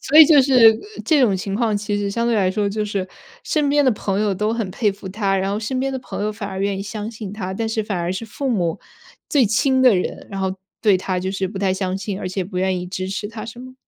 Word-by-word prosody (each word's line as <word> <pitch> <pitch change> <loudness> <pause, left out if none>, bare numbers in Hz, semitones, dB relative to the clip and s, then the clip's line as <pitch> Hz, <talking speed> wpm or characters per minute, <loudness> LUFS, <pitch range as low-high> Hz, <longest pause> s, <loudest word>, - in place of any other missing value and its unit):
所 300 - +4
以 315 - +12
就 295 -2 +6
是， 265 0 +2 0.2
呃， 405 - -7
这 310 -4 +4
种 205 -7 +3
情 195 +1 -4
况， 220 -1 +1
其 205 0 -2
实 200 -1 -1
相 235 +3 -1
对 235 - +2
来 190 -3 +2
说 205 +1 0
就 210 +1 -2
是 200 -2 -2 0.4
身 300 -2 0
边 290 0 +3
的 260 - +5
朋 200 -3 -2
友 210 -2 +1
都 210 +3 0
很 225 -4 -2
佩 210 +2 +1
服 195 0 -10
他， 195 0 0
然 190 +1 0
后 205 +2 -2
身 255 +4 -2
边 270 +1 -1
的 265 - -2
朋 250 - -6
友 215 - -1
反 210 -2 -6
而 190 - -5
愿 195 0 -1
意 - - -3
相 210 +1 -5
信 215 -3 -7
他， 190 -3 -4
但 225 +3 -2
是 220 -1 -1
反 200 -4 -2
而 170 +1 -1
是 190 +5 -3
父 270 +5 -4
母- 175 -8 0 0.5
最 280 -4 +4
亲 260 +5 +2
的 250 -4 +7
人， 180 - -3
然 195 -1 -4
后 190 -1 -1 0.3
对 205 -4 +4
他 185 0 -2
就 190 - -2
是 190 -1 -1
不 195 +1 -6
太 190 -1 +1
相 190 -1 -2
信， 195 0 -4
而 - - -5
且 185 +1 -2
不 185 +1 -8
愿 185 0 0
意 180 - -5
支 185 0 -4
持 205 +2 -4
他， 225 0 -7
是 235 +1 -9
吗？ 255 +1 -10
205 Hz, 310 characters per minute, -21 LUFS, 190-230 Hz, 0.5 s, 以